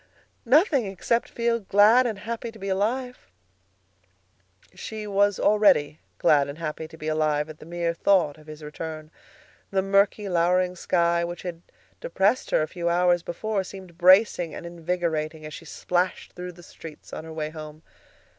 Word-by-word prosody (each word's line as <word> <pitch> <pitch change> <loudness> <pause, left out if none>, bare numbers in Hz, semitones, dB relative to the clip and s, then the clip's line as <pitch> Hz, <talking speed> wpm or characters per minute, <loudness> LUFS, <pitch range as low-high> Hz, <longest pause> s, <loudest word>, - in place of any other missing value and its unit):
Nothing, 280 - +4
except 215 +5 -1
feel 235 0 0
glad 215 +5 +5
and 220 -4 -3
happy 230 +2 -5
to 225 - -14
be 195 -1 -5
alive." 245 +6 -2 1.5
She 215 -1 -7
was 205 -1 +2
already 180 -8 +3 0.2
glad 145 -2 +3
and 140 - -7
happy 160 -1 -5
to 160 - -14
be 155 - -7
alive 155 -1 0
at 155 - -11
the 155 - -12
mere 170 0 -2
thought 170 -4 +2
of 155 - -18
his 155 0 -10
return. 155 +1 -7 0.6
The 190 -1 0
murky, 200 +1 +2
lowering 180 +1 +2
sky, 170 -1 +1
which 175 0 -5
had 170 -2 -6 0.4
depressed 255 - 0
her - - +2
a - - -3
few 170 0 -3
hours 175 0 +3
before, 200 +4 -3
seemed 185 -3 -11
bracing 185 -2 +5
and - - -8
invigorating 165 -2 -3
as 155 - -8
she 165 - -9
splashed 180 +3 -2
through 180 0 -7
the 175 +1 -15
streets 160 -2 -12
on - - -6
her 160 - -9
way 155 -1 -4
home. 155 0 -10
175 Hz, 165 wpm, -25 LUFS, 160-200 Hz, 1.5 s, glad